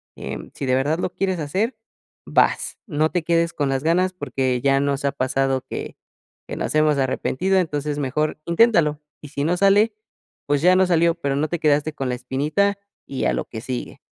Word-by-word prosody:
eh, - - -5 0.2
si - - -5
de 130 -1 +2
verdad 145 +5 +1
lo - - -1
quieres 190 -2 -1
hacer, 195 - -1 0.5
vas. - - +1
No 155 -3 +1
te 175 -3 -1
quedes 170 0 +2
con 145 - -1
las 135 0 -1
ganas 180 +3 +2
porque 130 -8 -1
ya 135 0 +3
nos 140 0 -1
ha 140 - +2
pasado 135 0 0
que - - -6 0.5
que - - -5
nos - - -2
hemos 155 -1 +3
arrepentido, 155 +8 0
entonces 150 -4 -1
mejor 150 +3 -1
inténtalo, 170 -6 +3 0.2
y 150 - -10
si 140 0 -3
no 170 +4 +1
sale, 205 +3 +4 0.5
pues, 145 -1 +1
ya 180 +2 +5
no 190 0 +4
salió, 170 -1 +3
pero, 140 -5 -2
no 150 +3 0
te 175 - -1
quedaste 150 0 +2
con 135 -3 -3
la - - -1
espinita 150 +11 0 0.3
y 135 - -3
a - - +2
lo - - -2
que 110 - -8
sigue. 125 +1 -5
150 Hz, 200 wpm, -22 LUFS, 135-175 Hz, 0.5 s, ya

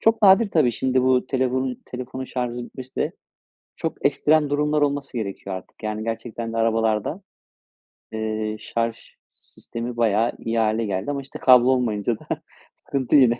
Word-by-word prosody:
çok 225 -1 +3
nadir 200 +2 +7
tabii. 140 -9 +3
Şimdi 130 +2 +1
bu 130 -1 +3
telefonu 130 -1 0
telefonun 130 +1 -6
şarjı 125 -1 -3
bitmesi 130 +1 -10
de - - 0 0.6
çok - - -4
ekstrem 150 -1 +3
durumlar 150 +1 +1
olması 140 -3 -1
gerekiyor 100 -3 -4
artık. 95 +4 -11
Yani, 110 0 -2
gerçekten 115 0 -4
de 115 - -2
arabalarda, 115 - +1 0.9
eee, 110 -1 -2
şarj 115 -1 -2 0.4
sistemi 120 +1 -8
bayağı 115 0 +3
iyi 115 0 -2
hâle 110 +1 +1
geldi. 100 +6 -2
Ama, 140 -1 -2
işte, 135 - -10
kablo 125 -1 +7
olmayınca 115 -3 +1
da - - -17 0.5
sıkıntı 135 0 -1
yine. 125 -4 +6
120 Hz, 150 wpm, -23 LUFS, 110-130 Hz, 0.9 s, nadir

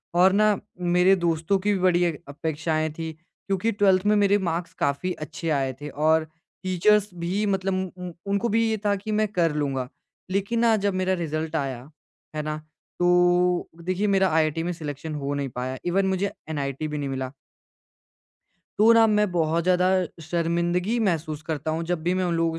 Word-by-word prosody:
और 185 +2 +6
ना 210 0 +4 0.2
मेरे 180 +2 +4
दोस्तों 170 +1 +1
की 205 +2 +1
भी 195 - -1
बड़ी 180 -1 +3
एक 165 -4 -2
अपेक्षाएँ 155 +1 -2
थीं। 160 -1 -4
क्योंकि 185 +6 -3
ट्वेल्थ 195 -2 +3
में 210 0 +4
मेरे 205 0 +4
मार्क्स 175 -2 -3
काफ़ी 140 +6 0
अच्छे 165 +2 -6
आए 135 -3 0
थे 150 - -5
और 155 +2 +2 0.4
टीचर्स 200 +3 +3
भी 180 +4 -2
मतलब 195 -1 0 0.2
उ, - - -10
उ - - -6 0.2
उनको 200 +4 +1
भी 225 +2 +2
ये 220 - 0
था 205 -1 +3
कि 205 +2 -5
मैं 215 0 +2
कर 175 -5 +1
लूँगा। 135 -4 -1 0.4
लेकिन 200 +4 0
ना 230 -1 +4
जब 200 - +2
मेरा 185 0 0
रिज़ल्ट 160 -2 -3
आया। 135 -3 -3 0.5
है 155 - -1
ना? 155 0 -3 0.4
तो 180 0 +3
देखिए 185 +4 0
मेरा 195 -1 +3
आईआईटी 160 0 +1
में 175 - -1
सिलेक्शन 155 -1 -6
हो 140 -1 -3
नहीं 140 -1 -2
पाया 130 +1 -3
इवन 190 +3 +2
मुझे 190 +1 0 0.2
एनआईटी 140 -1 -3
भी 150 0 -4
नहीं 140 -1 -3
मिला। 130 -1 -3 1.5
तो 220 +2 +7
ना 230 -1 +6
मैं 210 -2 +2
बहुत 165 -1 +1
ज़्यादा 180 +1 +3 0.3
शर्मिंदगी 170 +5 0
महसूस 160 -7 -1
करता 155 -1 -3
हूँ 160 +1 -2
जब 175 -3 -1
भी 175 +2 +1
मैं 185 0 0
उन 175 -1 0
लोगों 165 0 +1
175 Hz, 185 wpm, -25 LUFS, 155-195 Hz, 1.5 s, तो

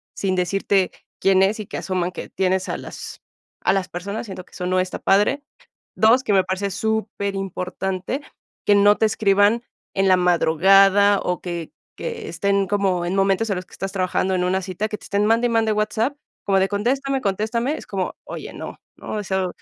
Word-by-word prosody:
sin 190 -2 -1
decirte 190 +1 +1 0.3
quién 190 0 +4
es 205 +3 +1
y 210 - -6
que - - -5
asuman 185 -2 -2
que - - -8
tienes 190 0 0
a - - -2
las - - -9 0.4
a - - +3
las 190 -1 -1
personas, 200 +6 -5
siento 185 -2 -8
que - - -26
eso 180 - -5
no 185 0 +2
está 185 0 -2
padre. 210 +9 +2 0.5
Dos, 230 +4 +4
que 215 - +1
me 190 -1 +4
parece 190 +2 -2
súper 215 -2 -2
importante 190 - -3 0.4
que 205 - +5
no 205 +1 +5
te - - +3
escriban 205 +2 +3 0.3
en 195 0 +2
la 185 -1 +5
madrugada 195 +4 +5
o 180 0 -1
que 170 -3 -5 0.3
que 465 -2 -5
estén 200 -1 0
como 195 -3 0
en 180 +2 -1
momentos 195 +3 +2
en 200 - +1
los 180 - -6
que - - -22
estás 195 0 -4
trabajando 185 0 0
en 180 - 0
una 190 +1 +1
cita, 185 +3 -3
que 210 - -4
te - - -20
estén 200 +1 +1
mande 230 +2 +3
y - - -2
mande 225 -1 +2
WhatsApp, 220 +5 0 0.3
como 195 -1 +3
de 190 - +2
contéstame, 265 +6 0
contéstame, 230 +8 -1
es - - -9
como 190 -2 -2
que: - - -58
"Oye, - - -7
no, - - -8 0.2
no", - - -7
o 210 - -2
sea, 190 -1 -1
195 Hz, 205 wpm, -22 LUFS, 185-215 Hz, 0.5 s, que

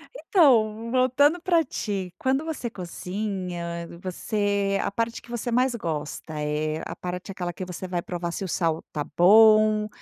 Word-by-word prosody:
Então, 230 - +3
voltando 270 +6 +3
para 345 -3 +3
ti, 195 - -4
quando 270 +4 0
você 285 -7 -4
cozinha 180 -3 -5
você 200 +1 -1
a - - -1
parte 230 +2 -2
que - - -18
você 240 0 -3
mais 250 +1 +2
gosta, 155 -4 -4
eh, 155 +1 -1
a - - -6
parte 180 +2 -6
aquela 175 -2 -3
que 185 +2 -6
você 180 +1 -6
vai 175 -1 -2
provar 175 -1 -4
se 195 - -4
o - - -4
sal 165 -2 0
está 150 -1 -4
bom, 215 +2 +6
200 Hz, 160 wpm, -25 LUFS, 175-235 Hz, -, bom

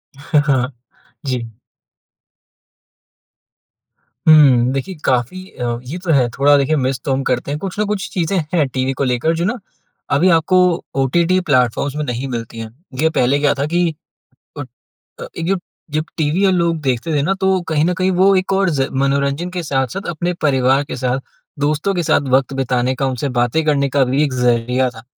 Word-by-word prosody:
हाँ, 145 +2 +1
हाँ। 130 -1 +1 0.6
जी। 115 -4 -4 2.7
हुँ। 135 -6 +6
देखिए 160 +8 -4
काफ़ी 130 +9 0
अ, 120 -1 -3
ये 140 +8 -6
तो 170 - 0
है 130 -4 +4
थोड़ा 145 +4 +3
देखिए 140 +3 +1
मिस 130 -2 -1
तो 135 - +1
हम 135 +1 -1
करते 125 +1 -1
हैं 150 - -3
कुछ 195 +3 -5
न 210 - +2
कुछ 205 -1 -3
चीज़ें 180 +1 0 0.2
हैं, 155 -5 +2
टीवी 130 +1 -2
को 140 - -2
लेकर 125 +5 +1
जो 170 - -1
ना 240 +6 -1 0.6
अभी 180 +6 +4
आपको 165 +2 +3 0.4
ओटीटी 170 +7 +2
प्लैटफ़ॉर्म्स 130 +1 +1
में 150 - -2
नहीं 125 +2 -3
मिलती 115 -2 -6
हैं। 115 -1 -6 0.3
ये 160 - +3
पहले 140 -2 +1
क्या 145 0 +2
था 140 0 -2
कि 175 -2 +1 0.7
ओ 145 - -3 0.6
अ, - - -6
एक 165 - -3
जो 195 - +1 0.3
जब 155 +1 -1
टीवी 160 +5 +1
और 190 - +4
लोग 170 -2 +1
देखते 130 +3 -1
थे 145 - +2
ना 190 - +1
तो 190 0 +2
कहीं 155 0 +2
न 180 - +1
कहीं 185 +2 0
वो 195 +1 +5
एक 185 +1 0
और 195 -1 +2
ज़ 145 -5 0 0.2
मनोरंजन 140 +5 0
के 180 -1 -4
साथ-साथ 140 +6 -2
अपने 175 +2 -2
परिवार 135 -1 +2
के - - -6
साथ 125 0 -1 0.4
दोस्तों 150 +7 0
के 175 -2 -1
साथ 145 - +1
वक़्त 135 0 0
बिताने 130 -1 0
का 135 - -1
उनसे 130 +1 -2
बातें 120 +7 +1
करने 140 -2 +1
का 135 0 +2
भी 135 +4 +1
एक 140 - -1
ज़रिया 125 +1 +1
था। 115 -2 -13
140 Hz, 190 wpm, -18 LUFS, 130-170 Hz, 2.7 s, हुँ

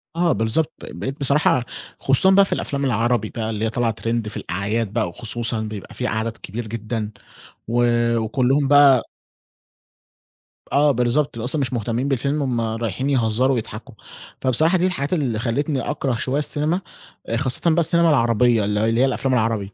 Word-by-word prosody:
آه 170 -1 +2
بالضبط، 115 +9 0
بقيت 135 +2 -6
بصراحة 140 -3 +2 0.3
خصوصًا 135 +8 +4
بقى 200 +1 +6
في - - -2
الأفلام 140 0 -2
العربي 120 -3 0
بقى 110 -1 -4
اللي 110 0 -2
هي - - 0
طالعة 115 -1 -1
Trend 115 -1 -1
في - - -6
الأعياد 100 +4 -3
بقى 110 -5 0
وخصوصًا 115 +4 -2
بيبقى 105 -2 -7
في 125 - -3
عدد 110 +1 -3
كبير 110 +3 -7
جدًا، 110 0 -4 0.6
و 120 +1 +2 0.3
وكُلّهم 130 +5 +1
بقى 140 -3 +5 1.6
آه 145 +1 +4
بالضبط، 125 +3 0
ت - - -8
أصلًا 125 +6 0
مش 130 -2 -2
مهتمّين 120 +3 -2
بالفيلم 140 +2 -1
هم 125 -4 -1
رايحين 115 +3 -2
يهزّروا 130 0 +1
ويضحكوا، 115 +2 -6 0.5
فبصراحة 155 +8 +3
دي 180 - +1
الحاجات 145 -4 -2
اللي 130 -10 -1
خلّتني 130 +4 -1
أكره 130 +2 -2
شوية 130 +5 -1
السينما، 150 +5 -1 0.5
آآ، 115 - 0
خاصةً 130 +6 +2
بقى 165 - +2
السينما 170 0 +3
العربية 120 -5 +3
ال 105 0 -1
اللي 115 +3 +1
هي - - +5
الأفلام 135 0 -1
العربي، 110 -4 -1
120 Hz, 165 wpm, -21 LUFS, 110-140 Hz, 1.6 s, بقى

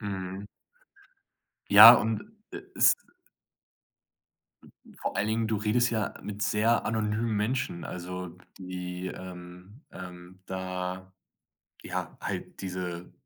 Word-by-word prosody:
Mhm. 95 -1 -5 1.3
Ja, 110 +4 +12
und 110 -2 0 0.3
e 395 0 -7
es - - +5 2.0
Vor - - -4
allen 100 - +1
Dingen, 110 +1 0
du 110 -1 0
redest 115 +4 +2
ja 110 -3 -1
mit 105 0 -7
sehr 105 +3 +2
anonymen 110 +1 -1
Menschen, 105 -4 -1
also 90 0 -7 0.2
die, 90 0 -6
ähm 90 - -10
ähm, 90 0 -11
da 95 0 -5 0.7
ja, - - -5
halt - - -5
diese 90 -2 -5
95 Hz, 105 wpm, -28 LUFS, 90-110 Hz, 2.0 s, Ja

